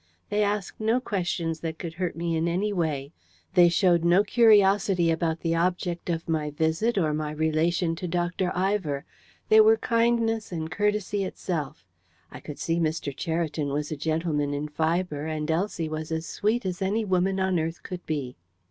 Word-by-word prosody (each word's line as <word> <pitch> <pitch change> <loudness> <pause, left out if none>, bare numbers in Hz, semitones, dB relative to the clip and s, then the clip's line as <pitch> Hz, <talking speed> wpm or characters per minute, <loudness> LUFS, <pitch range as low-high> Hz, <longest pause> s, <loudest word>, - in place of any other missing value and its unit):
They 210 +1 +2
asked 205 -1 -1
no 225 +3 +2
questions 175 -7 -2
that 160 -1 -4
could 170 -2 -6
hurt 180 +1 -3
me 165 0 -1
in 160 +1 0
any 195 +5 0
way. 155 -5 -2 0.4
They 175 -2 +7
showed 175 -1 +3
no 175 +4 +5
curiosity 200 -5 +4
about 165 0 -1
the 165 -1 0
object 175 0 -1
of 165 -1 -2
my 155 -2 0
visit 160 +10 0
or 155 -5 +2
my 150 0 -2
relation 160 +2 0
to 180 - -4
Dr. 175 +1 -1
Ivor. 180 -7 0 0.4
They 435 0 +8
were 440 +1 +6
kindness 230 - +1
and 160 -2 -4
courtesy 205 0 0
itself. 165 - -4 0.5
I - - -9
could 150 - -8
see 165 +1 -1
Mr. 155 -4 -1
Cheriton 160 -1 -2
was 145 +2 -2
a - - -1
gentleman 155 -1 -1
in 150 +1 -3
fibre, 160 0 -1
and 155 0 -2
Elsie 170 -1 -1
was 155 0 -5
as 160 0 -2
sweet 215 +4 -1
as 180 -1 -3
any 210 +4 0
woman 190 0 +1
on 190 -2 +1
earth 165 +1 -4
could 180 -1 -7
be. 140 -5 -3
170 Hz, 175 wpm, -26 LUFS, 160-195 Hz, 0.5 s, They